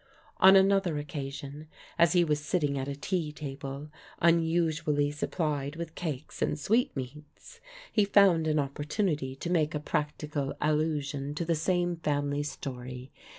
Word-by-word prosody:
On 190 +1 +8
another 195 -4 +4
occasion, 145 0 -6 0.3
as 170 +1 +5
he 175 -1 +5
was 150 -3 +1
sitting 150 -2 0
at 135 0 -3
a 140 - -3
tea 160 +1 -2
table, 140 0 -7 0.3
unusually 160 -3 +2
supplied 150 -1 -2
with 165 -1 -6
cakes 155 -6 -5
and - - +1
sweetmeats, 150 - -2 0.3
he 210 - +3
found 195 -5 +5
an 155 0 +2
opportunity 145 0 -1
to 170 +6 -4
make 160 -3 +1
a - - 0
practical 150 -1 -2
allusion 150 -2 -1
to 170 - -2
the 165 - +1
same 175 +2 0
family 145 -2 -1
story. 130 -3 -6
150 Hz, 140 wpm, -29 LUFS, 145-170 Hz, 0.3 s, On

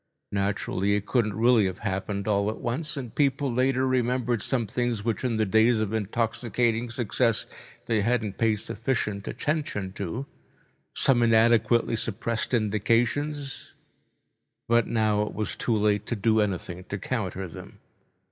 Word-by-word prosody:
Naturally, 100 0 0
it 105 0 -2
couldn't 105 -5 +1
really 115 -1 +4
have 95 -1 -4
happened 100 +1 -2
all 100 -1 +2
at 110 - -4
once, 150 +5 -2
and 125 -5 -6
people 140 -2 +1
later 130 +1 +2
remembered 125 -2 +1
some 125 0 0
things 115 0 -2
which 115 +1 -1
in 125 -3 0
the 110 0 +1
days 110 +3 +4
of 110 -1 -1
intoxicating 115 +2 0
success 120 -1 +1 0.4
they 110 -2 +1
hadn't 110 -2 -1
paid 115 -2 +3
sufficient 105 -2 -3
attention 120 - -2
to, 105 +7 -4 0.7
some 125 -3 +3
inadequately 115 0 +4
suppressed 115 +1 -2
indications, 120 +6 0 0.9
but 115 0 +3
now 110 -2 +1
it 105 - -3
was 105 0 -3
too 115 -3 0
late 105 0 +1
to 120 - -1
do 110 +1 +2
anything 90 -3 -3
to 100 - -4
counter 95 -4 -3
them. 80 - -11
115 Hz, 145 wpm, -26 LUFS, 105-120 Hz, 0.9 s, really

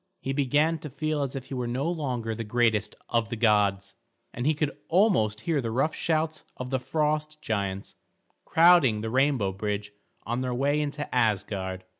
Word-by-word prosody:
He 135 - -3
began 145 +4 +2
to 150 - -7
feel 155 +2 -2
as 140 -1 -3
if 135 -1 -5
he - - -9
were 125 -2 -2
no 130 +6 -1
longer 130 -9 -2
the 115 +1 -4
greatest 110 -1 +1
of 115 -1 +1
the 120 - -3
gods, 100 -3 +2 0.4
and 120 +3 -2
he 155 - +3
could 150 -1 -1
almost 160 - +2
hear 160 -4 0
the 115 - -3
rough 135 +7 +1
shouts 160 -1 -1
of 125 0 -6
the 130 - +1
frost 150 +3 -1
giants 100 -7 -3 0.5
crowding 160 -10 +5
the 110 0 -3
rainbow 130 -6 +2
bridge 105 +1 -3 0.3
on 120 +2 -2
their 125 -1 -2
way 140 +4 +1
into 150 0 -3
Asgard. 100 -5 0
125 Hz, 180 wpm, -27 LUFS, 110-150 Hz, 0.5 s, crowding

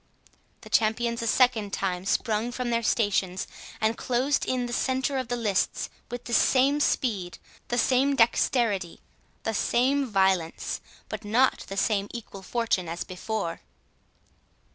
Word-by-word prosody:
The - - -12
champions 230 +2 +1
a 230 - -2
second 225 -4 +3
time 185 -1 -2
sprung 220 +3 0
from 245 -1 -3
their 230 0 +1
stations, 200 -5 +1 0.3
and 220 +1 +1
closed 260 +4 0
in 255 -1 0
the 240 - -5
centre 260 +2 0
of 255 - -4
the 245 - -1
lists, 210 -5 0 0.2
with 245 0 -6
the 240 - -6
same 275 +4 +4
speed, 205 -11 0 0.3
the 240 - -1
same 265 +3 +3
dexterity, 230 -6 +2 0.4
the 225 - -1
same 265 +6 +2
violence, 190 -5 0 0.3
but - - -6
not 235 +6 +2
the 195 - -6
same 200 0 +1
equal 205 -4 -8
fortune 195 -4 -1
as 170 +1 -3
before. 185 -1 -4
230 Hz, 140 wpm, -27 LUFS, 195-250 Hz, 0.4 s, same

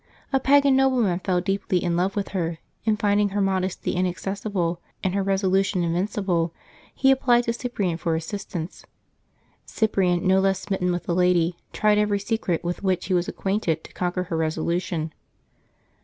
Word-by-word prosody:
A 270 - +4
pagan 280 0 +5
nobleman 250 -9 +2
fell 185 -1 0
deeply 195 -1 0
in 175 -1 0
love 185 +3 0
with 200 -1 -2
her, 170 -4 -2 0.3
and 215 -1 +2
finding 205 0 +2
her 200 +1 -2
modesty 190 -1 0
inaccessible, 185 -1 -2 0.2
and 185 - 0
her 200 0 +1
reso 195 0 +1
lution 190 -1 +2
invincible, 175 -1 0 0.4
he 270 - +3
applied 245 -2 +4
to 230 - -1
Cyprian 205 -8 -2
for 165 0 -1
assistance. 170 0 -5 0.8
Cyprian, 190 -5 +1
no 190 +1 +4
less 195 0 +2
smitten 190 -3 -1
with 175 0 -2
the 175 - -1
lady, 180 -1 +3 0.2
tried 210 -1 +3
every 210 -1 +2
secret 200 -4 -1
with 175 0 -3
which 185 -2 0
he 185 - -1
was 175 -1 +1
acquainted 190 -5 -1
to - - -13
conquer 180 0 -1
her 175 -2 -3
resolution. 160 0 -1
190 Hz, 165 wpm, -24 LUFS, 175-205 Hz, 0.8 s, pagan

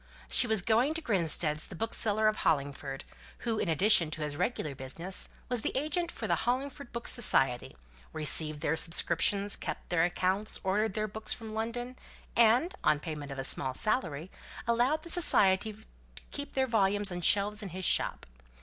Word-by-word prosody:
She 245 - +3
was 220 -5 +1
going 240 - +2
to 330 - -2
Grinstead's, 165 - 0
the 190 - -10
bookseller 220 +1 0
of 215 - +1
Hollingford; 140 -2 -2 0.4
who, 225 -2 -1
in - - -1
addition 180 0 +6
to 155 0 -4
his 150 -1 -3
regular 175 - -2
business, 165 +8 -5 0.2
was 245 -2 -2
the - - -2
agent 320 +5 -1
for - - -5
the - - +1
Hollingford 265 +2 -2
Book 235 0 -6
Society, 135 - +2 0.4
received 155 0 0
their 160 0 0
subscriptions, 180 +5 +3
kept - - -6
their 175 -2 +2
accounts, 185 +4 0
ordered 205 +2 0
their 215 0 -1
books 220 +1 -1
from 220 -1 -9
London, 240 +3 -4 0.4
and, 240 +10 +4
on 150 - +3
payment 150 -3 -6
of 135 - -7
a 135 - -3
small 130 0 -1
salary, 170 - -1 0.3
allowed 245 +6 +1
the 340 - -9
Society 210 - +3
to 215 +1 -16 0.5
keep 285 -1 -6
their 265 -1 +1
volumes 205 -4 +1
on 175 0 -5
shelves 205 +4 +3
in 200 - -6
his 185 +1 -4
shop. - - +1
205 Hz, 175 wpm, -30 LUFS, 160-235 Hz, 0.5 s, addition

